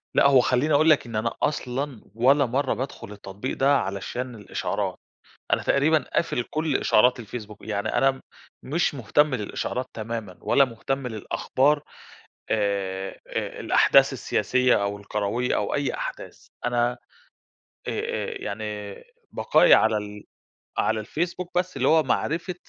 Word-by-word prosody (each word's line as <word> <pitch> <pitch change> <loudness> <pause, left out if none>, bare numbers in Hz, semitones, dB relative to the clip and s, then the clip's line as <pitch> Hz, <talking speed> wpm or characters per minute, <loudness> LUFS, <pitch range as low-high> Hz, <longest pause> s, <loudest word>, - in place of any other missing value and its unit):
لأ، - - +6
هو 135 -3 +6
خليني 130 +5 +1
أقول 155 +3 +5
لك 150 -5 +4
إن 115 -2 -7
أنا 115 +2 0
أصلًا 135 -3 -2
ولا 135 +4 +4
مرّة 130 +3 0
بادخل 130 -5 -6
التطبيق 100 +4 -6
ده 140 +1 +4
علشان 120 +6 -4
الإشعارات، 105 -3 -3 0.5
أنا - - +3
تقريبًا 155 +3 +3 0.2
قافل 125 -7 +1
كل 155 -3 0
إشعارات 125 +3 +3
الفيسبوك، 105 -1 -8
يعني 100 -2 -2
أنا 135 0 +3
م 130 - -9 0.4
مش 155 +2 0
مهتم 140 +4 +2
للإشعارات 125 +3 -3
تمامًا، 110 -4 -5
ولا 140 - +4
مهتم 130 +2 -4
للأخبار 135 +6 0 0.7
آآ، 95 -2 -1 0.2
آآ - - -4
الأحداث - - +4
السياسية 125 -5 +1
أو 100 0 -2
الكروية، 105 +4 -1
أو - - -1
أي 140 -1 0
أحداث - - -7 0.2
أنا 120 0 +2
آآ، 125 - -10 1.0
آآ، - - -3
يعني 105 -1 -5 0.4
بقائي - - +5
على 110 -1 +4
ال 105 0 -6 0.5
على 110 0 +1
الفيسبوك 175 +9 -3
بس 185 0 -1
اللي - - +1
هو 160 0 +5
معرفة 170 +4 -1
125 Hz, 140 wpm, -25 LUFS, 105-140 Hz, 1.0 s, لأ